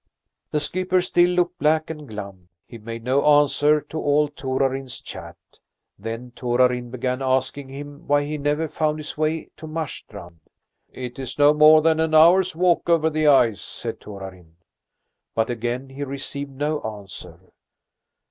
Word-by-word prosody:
The 150 Hz, -, 0 dB
skipper 185 Hz, +5 st, 0 dB
still 175 Hz, 0 st, +3 dB
looked 180 Hz, 0 st, 0 dB
black 155 Hz, +1 st, +2 dB
and 150 Hz, -2 st, -9 dB
glum; 100 Hz, -5 st, -9 dB, 0.2 s
he 115 Hz, -, -11 dB
made 115 Hz, +1 st, -7 dB
no 130 Hz, +3 st, +2 dB
answer 145 Hz, 0 st, +4 dB
to 155 Hz, +2 st, -7 dB
all 145 Hz, 0 st, +2 dB
Torarin's 135 Hz, -2 st, -2 dB
chat. -, -, -10 dB, 0.6 s
Then 115 Hz, +4 st, -6 dB
Torarin 125 Hz, 0 st, +1 dB
began 130 Hz, +1 st, -3 dB
asking 130 Hz, +1 st, -1 dB
him 145 Hz, +1 st, -10 dB
why 145 Hz, 0 st, +2 dB
he 150 Hz, +1 st, -4 dB
never 145 Hz, +3 st, 0 dB
found 155 Hz, 0 st, -1 dB
his 155 Hz, -, -7 dB
way 155 Hz, +1 st, -2 dB
to 160 Hz, -, -9 dB
Marstrand. 105 Hz, -, -7 dB, 0.5 s
"It 125 Hz, 0 st, -7 dB
is 130 Hz, -2 st, -6 dB
no 145 Hz, 0 st, +6 dB
more 155 Hz, +1 st, +7 dB
than 160 Hz, 0 st, +3 dB
an 160 Hz, 0 st, +1 dB
hour's 180 Hz, +3 st, +6 dB
walk 175 Hz, 0 st, +2 dB
over 160 Hz, -1 st, +3 dB
the 155 Hz, 0 st, +1 dB
ice," 120 Hz, -7 st, +4 dB
said -, -, -6 dB
Torarin. 95 Hz, -5 st, -10 dB, 0.8 s
But 115 Hz, +1 st, +1 dB
again 120 Hz, +3 st, -3 dB
he 135 Hz, +2 st, -6 dB
received 140 Hz, +1 st, -5 dB
no 150 Hz, +3 st, -2 dB
answer. 95 Hz, -4 st, -9 dB
145 Hz, 155 wpm, -23 LUFS, 120-155 Hz, 0.8 s, more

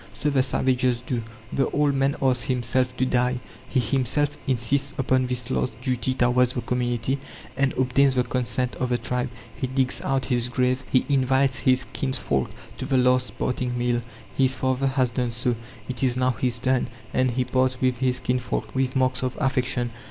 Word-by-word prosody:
So 150 Hz, -, 0 dB
the 135 Hz, -2 st, +3 dB
savages 130 Hz, -1 st, +1 dB
do. 125 Hz, -1 st, -3 dB, 0.3 s
The 135 Hz, -, +1 dB
old 145 Hz, -1 st, +2 dB
man 135 Hz, +1 st, +1 dB
asks 125 Hz, -2 st, +2 dB
himself 125 Hz, 0 st, 0 dB
to 130 Hz, -, +2 dB
die; 125 Hz, 0 st, +1 dB, 0.3 s
he -, -, +1 dB
himself 135 Hz, +5 st, +1 dB
insists 135 Hz, +2 st, 0 dB
upon 130 Hz, -1 st, +2 dB
this 125 Hz, 0 st, -2 dB
last 115 Hz, -3 st, -1 dB
duty 125 Hz, 0 st, 0 dB
towards 125 Hz, 0 st, +3 dB
the 125 Hz, -, -2 dB
community, 125 Hz, +2 st, -1 dB, 0.4 s
and 135 Hz, 0 st, +2 dB
obtains 130 Hz, +1 st, +3 dB
the 125 Hz, -, +3 dB
consent 125 Hz, 0 st, -1 dB
of 125 Hz, -, -1 dB
the 120 Hz, -, +2 dB
tribe; 125 Hz, +1 st, -2 dB, 0.3 s
he 130 Hz, -, -2 dB
digs 130 Hz, 0 st, 0 dB
out 135 Hz, -1 st, 0 dB
his 125 Hz, -2 st, +1 dB
grave; 125 Hz, +1 st, +1 dB
he 130 Hz, -, +3 dB
invites 130 Hz, -1 st, +2 dB
his 130 Hz, -1 st, +2 dB
kinsfolk 130 Hz, -3 st, 0 dB, 0.3 s
to 130 Hz, -, -4 dB
the 135 Hz, -2 st, +2 dB
last 125 Hz, 0 st, +2 dB
parting 125 Hz, -1 st, -1 dB
meal. 120 Hz, 0 st, +1 dB, 0.3 s
His 130 Hz, -1 st, +3 dB
father 130 Hz, +1 st, 0 dB
has 130 Hz, -2 st, +1 dB
done 125 Hz, +1 st, -1 dB
so, 120 Hz, +1 st, 0 dB, 0.3 s
it 130 Hz, -2 st, -4 dB
is 130 Hz, -2 st, +2 dB
now 130 Hz, 0 st, +3 dB
his 120 Hz, 0 st, -1 dB
turn; 130 Hz, +1 st, +1 dB, 0.3 s
and 130 Hz, 0 st, +2 dB
he 125 Hz, +1 st, 0 dB
parts 130 Hz, 0 st, +1 dB
with 130 Hz, -1 st, +1 dB
his 125 Hz, -1 st, +1 dB
kinsfolk 125 Hz, 0 st, -2 dB
with 130 Hz, 0 st, 0 dB
marks 130 Hz, -1 st, +2 dB
of 130 Hz, -1 st, -2 dB
affection. 130 Hz, -2 st, 0 dB
130 Hz, 185 wpm, -24 LUFS, 125-130 Hz, 0.4 s, the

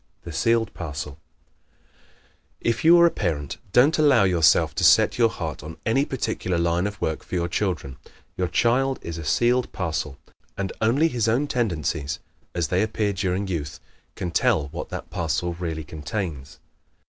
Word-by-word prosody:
The 85 Hz, -, -7 dB
Sealed 115 Hz, +3 st, +1 dB
Parcel 75 Hz, -3 st, -5 dB
¶ -, -, -19 dB, 1.4 s
If 115 Hz, -1 st, -1 dB
you 170 Hz, +2 st, +7 dB
are 170 Hz, -, +7 dB
a 170 Hz, -, +4 dB
parent 75 Hz, -6 st, -2 dB
don't 140 Hz, -, +4 dB
allow 145 Hz, -8 st, +5 dB
yourself 90 Hz, -4 st, +4 dB
to -, -, -2 dB
set -, -, +5 dB
your 115 Hz, -1 st, +5 dB
heart 80 Hz, -8 st, -5 dB
on 80 Hz, +3 st, -9 dB
any 135 Hz, +5 st, +2 dB
particular 110 Hz, -9 st, -2 dB
line 85 Hz, +3 st, +1 dB
of 105 Hz, +1 st, -7 dB
work 80 Hz, -, -2 dB
for -, -, -6 dB
your 85 Hz, -1 st, 0 dB
children. 85 Hz, -8 st, -2 dB, 0.4 s
Your 90 Hz, -, -1 dB
child 125 Hz, +9 st, +2 dB
is 85 Hz, 0 st, -5 dB
a -, -, -6 dB
sealed 120 Hz, +9 st, +2 dB
parcel 80 Hz, -6 st, -3 dB, 0.4 s
and 100 Hz, -1 st, -3 dB
only 125 Hz, +9 st, +3 dB
his 120 Hz, -8 st, -1 dB
own 120 Hz, +6 st, +2 dB
tendencies, 85 Hz, -, -1 dB, 0.4 s
as 85 Hz, -4 st, 0 dB
they 90 Hz, +1 st, +2 dB
appear 110 Hz, -1 st, 0 dB
during 95 Hz, +1 st, -1 dB
youth, 75 Hz, -5 st, -4 dB, 0.4 s
can 90 Hz, -, -4 dB
tell 75 Hz, -3 st, +2 dB
what -, -, -6 dB
that -, -, -7 dB
parcel 85 Hz, +1 st, -1 dB
really 85 Hz, -2 st, -4 dB
contains. 75 Hz, -1 st, -5 dB
90 Hz, 170 wpm, -24 LUFS, 80-115 Hz, 1.4 s, you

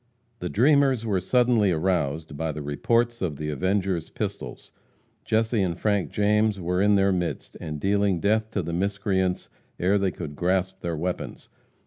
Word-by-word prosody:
The 90 Hz, -, -4 dB
dreamers 135 Hz, -1 st, +3 dB
were 100 Hz, -4 st, +1 dB
suddenly 120 Hz, -5 st, +3 dB
aroused 80 Hz, -3 st, -1 dB
by 80 Hz, +2 st, -2 dB
the 75 Hz, 0 st, -6 dB
reports 115 Hz, +11 st, 0 dB
of 85 Hz, -6 st, -1 dB
the 75 Hz, +2 st, -4 dB
avengers' 95 Hz, +2 st, -1 dB
pistols. -, -, -6 dB, 0.5 s
Jesse 110 Hz, 0 st, +1 dB
and 90 Hz, -3 st, -1 dB
Frank 105 Hz, -3 st, +1 dB
James 105 Hz, 0 st, +2 dB
were 90 Hz, +1 st, 0 dB
in 105 Hz, 0 st, +4 dB
their 100 Hz, 0 st, +3 dB
midst, 90 Hz, -2 st, -3 dB
and 75 Hz, -1 st, -5 dB
dealing 100 Hz, 0 st, +1 dB
death 110 Hz, +4 st, +1 dB
to 100 Hz, -4 st, -2 dB
the 85 Hz, +1 st, -4 dB
miscreants 95 Hz, 0 st, -1 dB, 0.3 s
ere 95 Hz, +3 st, +2 dB
they 95 Hz, -1 st, +1 dB
could 80 Hz, -5 st, -7 dB
grasp 95 Hz, +3 st, 0 dB
their 85 Hz, -2 st, -3 dB
weapons. 90 Hz, +3 st, -4 dB
95 Hz, 160 wpm, -25 LUFS, 85-105 Hz, 0.5 s, in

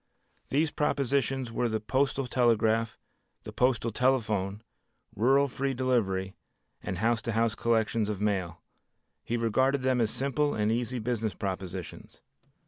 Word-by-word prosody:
These 150 Hz, +2 st, +1 dB
propositions 135 Hz, -3 st, 0 dB
were 120 Hz, +1 st, 0 dB
the 110 Hz, 0 st, -1 dB
postal 135 Hz, +4 st, 0 dB
telegraph, 115 Hz, -2 st, +2 dB, 0.5 s
the -, -, -8 dB
postal 120 Hz, -2 st, +1 dB
telephone, 110 Hz, -5 st, 0 dB, 0.5 s
rural 135 Hz, +6 st, +4 dB
free 135 Hz, 0 st, -2 dB
delivery 100 Hz, -7 st, 0 dB, 0.5 s
and 90 Hz, -, -4 dB
house 115 Hz, +3 st, +1 dB
to 115 Hz, +1 st, -3 dB
house 115 Hz, 0 st, +2 dB
collections 110 Hz, -1 st, +1 dB
of 105 Hz, -3 st, -3 dB
mail. 95 Hz, -5 st, -2 dB, 0.6 s
He 120 Hz, -, -2 dB
regarded 130 Hz, +4 st, +1 dB
them 130 Hz, -2 st, +2 dB
as 110 Hz, -, +2 dB
simple 140 Hz, +5 st, 0 dB
and 105 Hz, 0 st, +1 dB
easy 120 Hz, +2 st, -1 dB
business 110 Hz, -4 st, -2 dB
propositions. 95 Hz, -2 st, -6 dB
115 Hz, 135 wpm, -29 LUFS, 105-130 Hz, 0.6 s, rural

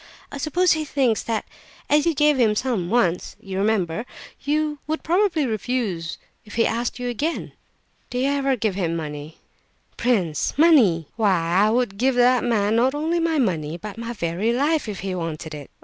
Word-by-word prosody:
I 285 Hz, -, -6 dB
suppose 350 Hz, +5 st, +2 dB
he 315 Hz, -1 st, +1 dB
thinks 265 Hz, -7 st, +1 dB
that 225 Hz, -2 st, -2 dB, 0.4 s
as 295 Hz, +2 st, +3 dB
you 330 Hz, -, +2 dB
gave 295 Hz, -1 st, +3 dB
him 220 Hz, -3 st, +3 dB
some 215 Hz, -7 st, -1 dB
once 185 Hz, -6 st, +1 dB
(you 195 Hz, -1 st, -7 dB
remember), 200 Hz, -2 st, 0 dB, 0.4 s
you 300 Hz, +1 st, 0 dB
would 315 Hz, +1 st, -2 dB
probably 345 Hz, -3 st, +2 dB
refuse 215 Hz, -7 st, -2 dB, 0.3 s
if 210 Hz, -, -12 dB
he 230 Hz, -, +3 dB
asked 235 Hz, +1 st, -1 dB
you 245 Hz, 0 st, -4 dB
again." 285 Hz, +8 st, -2 dB, 0.6 s
"Do 245 Hz, -, -4 dB
you 265 Hz, +2 st, +1 dB
ever 275 Hz, -1 st, +1 dB
give 220 Hz, -4 st, -1 dB
him 175 Hz, -3 st, -1 dB
money?" 150 Hz, -1 st, -6 dB, 0.6 s
"Prince! 195 Hz, -, 0 dB
Money! 235 Hz, -, +5 dB
Why 215 Hz, -3 st, +3 dB, 0.4 s
I -, -, +3 dB
would 225 Hz, -4 st, 0 dB
give 260 Hz, +1 st, +2 dB
that 245 Hz, 0 st, +4 dB
man 220 Hz, -3 st, +1 dB
not 260 Hz, +4 st, +2 dB
only 320 Hz, +3 st, 0 dB
my 330 Hz, -1 st, +1 dB
money, 170 Hz, -, 0 dB
but 210 Hz, +5 st, -8 dB
my 230 Hz, +1 st, -4 dB
very 185 Hz, +2 st, -1 dB
life, 285 Hz, +1 st, +1 dB
if 200 Hz, -, -5 dB
he 190 Hz, 0 st, -3 dB
wanted 165 Hz, -2 st, -5 dB
it. 145 Hz, -2 st, -8 dB
235 Hz, 180 wpm, -23 LUFS, 190-280 Hz, 0.6 s, Money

